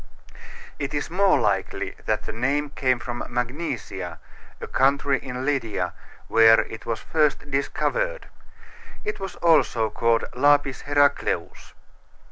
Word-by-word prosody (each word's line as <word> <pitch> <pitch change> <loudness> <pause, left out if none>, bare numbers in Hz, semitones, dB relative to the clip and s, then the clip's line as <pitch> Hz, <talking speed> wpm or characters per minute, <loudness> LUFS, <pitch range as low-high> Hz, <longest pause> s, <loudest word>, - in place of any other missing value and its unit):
It 140 +1 -3
is 145 - -3
more 195 +1 +3
likely 100 -2 -1
that - - 0
the - - -6
name 140 +5 -1
came 130 -3 +1
from 120 0 -5
Magnesia, 125 - -4 0.4
a - - -5
country 140 +1 +2
in 125 0 -5
Lydia, 110 -11 -1 0.3
where 115 0 +6
it 115 - -9
was 115 - -1
first 150 -2 0
discovered. - - -1 0.8
It 420 - -3
was 195 -1 -6
also 135 -10 +3
called 115 0 +1
Lapis 145 0 +3
Heracleus. 145 0 0
135 Hz, 120 wpm, -24 LUFS, 115-145 Hz, 0.8 s, where